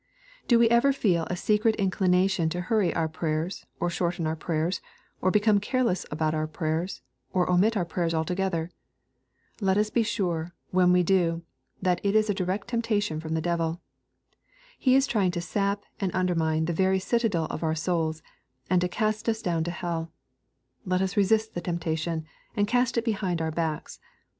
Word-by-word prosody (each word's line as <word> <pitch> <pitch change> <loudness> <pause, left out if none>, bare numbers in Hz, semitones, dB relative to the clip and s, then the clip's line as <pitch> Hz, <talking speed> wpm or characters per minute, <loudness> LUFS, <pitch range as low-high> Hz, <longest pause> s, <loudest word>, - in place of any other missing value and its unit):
'' - - -27
Do 240 - +5
we 230 0 +5
ever 235 +4 +5
feel 180 -11 +1
a 180 - -2
secret 215 +3 +2
inclination 185 -2 +2
to 175 +2 -3
hurry 200 0 +1
our 165 -1 0
pray 160 0 -2
ers, 165 +5 -3
or 175 - 0
shorten 175 -1 -1
our 155 +1 0
prayers, 165 +2 -1 0.4
or 185 - +3
become 210 +1 +4
careless 235 -3 0
about 155 +1 0
our 155 0 -1
prayers, 160 -1 -3 0.3
or 180 -1 +2
omit 195 +5 +3
our 180 - 0
prayers 170 0 -1
altogether? 170 +1 -1 0.9
Let 195 -2 +2
us 210 0 +1
be 235 - +3
sure, 175 -6 -2 0.2
when 180 -1 +4
we 180 0 +4
do, 170 -2 +2 0.4
that 180 -2 +2
it 200 +1 +1
is 215 -1 +4
a - - +1
direct 190 +3 -2
temptation 215 -8 0
from 160 0 -3
the 160 - 0
devil. 170 0 -1 1.0
He 255 -1 +4
is 270 0 +5
trying 205 -8 +1
to 175 - -2
sap 200 +3 -1 0.2
and 195 - 0
undermine 165 -4 +1
the 170 - -1
very 190 +3 +2
citadel 200 -4 0
of - - -5
our 160 -1 0
souls, 160 -1 -1 0.5
and 180 -1 +4
tcTcast 215 +5 0
us 220 0 -1
down 165 -2 0
to - - -2
hell. 170 -1 -3 0.7
Let 185 0 0
as 190 0 -2
resist 220 +2 +2
the 175 - -3
temptation, 165 -2 -2 0.3
and 205 -2 +2
cast 245 +1 +1
it 235 - +1
behind 195 -6 -1
our 160 -1 -1
backs. 160 -1 -3
180 Hz, 180 wpm, -27 LUFS, 165-205 Hz, 1.0 s, Do